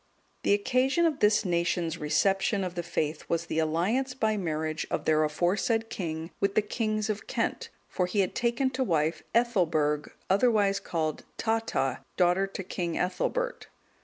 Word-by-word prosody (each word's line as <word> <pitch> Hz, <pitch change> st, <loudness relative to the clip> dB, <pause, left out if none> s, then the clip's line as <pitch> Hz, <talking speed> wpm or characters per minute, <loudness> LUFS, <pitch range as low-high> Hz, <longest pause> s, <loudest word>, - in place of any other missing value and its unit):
The 200 Hz, -, +4 dB
occasion 255 Hz, +9 st, +2 dB
of 315 Hz, -4 st, +1 dB
this 210 Hz, +1 st, +4 dB
nation's 170 Hz, -1 st, 0 dB
reception 195 Hz, +6 st, +1 dB
of 180 Hz, -2 st, -3 dB
the 175 Hz, -, -2 dB
faith 155 Hz, -2 st, -2 dB
was 170 Hz, 0 st, 0 dB
the 160 Hz, -, -1 dB
alliance 195 Hz, +12 st, 0 dB
by 220 Hz, -4 st, +1 dB
marriage 155 Hz, -4 st, -2 dB
of -, -, -2 dB
their 155 Hz, 0 st, +3 dB
aforesaid 195 Hz, +9 st, 0 dB
king 165 Hz, -2 st, -4 dB
with 200 Hz, 0 st, 0 dB
the 215 Hz, -, +4 dB
kings 215 Hz, 0 st, -1 dB
of 215 Hz, -1 st, -3 dB
Kent, -, -, -2 dB, 0.2 s
for 180 Hz, -, -1 dB
he 200 Hz, +2 st, +1 dB
had 185 Hz, -, -1 dB
taken 240 Hz, +3 st, +1 dB
to 260 Hz, 0 st, 0 dB
wife 160 Hz, -6 st, 0 dB
Ethelberg, 160 Hz, -11 st, +2 dB, 0.2 s
otherwise 200 Hz, -1 st, +3 dB
called 155 Hz, -3 st, -2 dB
Tata,(210) 225 Hz, -, -1 dB
daughter 180 Hz, +2 st, +3 dB
to 195 Hz, 0 st, -6 dB
King 175 Hz, -2 st, -3 dB
Ethelbert. -, -, -1 dB
190 Hz, 160 wpm, -28 LUFS, 165-225 Hz, 0.2 s, The